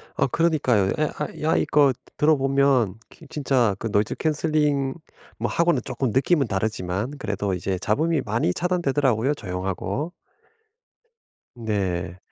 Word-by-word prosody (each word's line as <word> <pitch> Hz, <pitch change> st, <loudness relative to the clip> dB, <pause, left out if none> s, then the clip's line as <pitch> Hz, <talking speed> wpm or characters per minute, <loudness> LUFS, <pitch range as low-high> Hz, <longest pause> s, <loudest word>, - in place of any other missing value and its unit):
어 135 Hz, -, +2 dB
그러니까요. 135 Hz, -, +2 dB
에 155 Hz, -, +2 dB
아 150 Hz, -, -1 dB
야 155 Hz, -, +2 dB
이거 145 Hz, -3 st, +4 dB, 0.2 s
들어보면 135 Hz, -7 st, +3 dB
그 -, -, -15 dB
진짜 130 Hz, -8 st, +1 dB
그 -, -, -3 dB
노이즈 105 Hz, +1 st, +1 dB
캔슬링 150 Hz, -3 st, +1 dB, 0.4 s
뭐 -, -, -2 dB
하고는 170 Hz, 0 st, +2 dB
쪼끔 130 Hz, -1 st, -2 dB
느낌은 135 Hz, +3 st, +2 dB
다르지만 100 Hz, +2 st, -2 dB
그래도 105 Hz, -5 st, -2 dB
이제 95 Hz, +1 st, -2 dB
잡음이 155 Hz, -, +1 dB
많이 110 Hz, -6 st, 0 dB
차단되더라고요, 145 Hz, -, +1 dB
조용하고. 95 Hz, -, -3 dB, 1.4 s
네. 95 Hz, -6 st, -2 dB
130 Hz, 290 characters per minute, -24 LUFS, 105-150 Hz, 1.4 s, 이거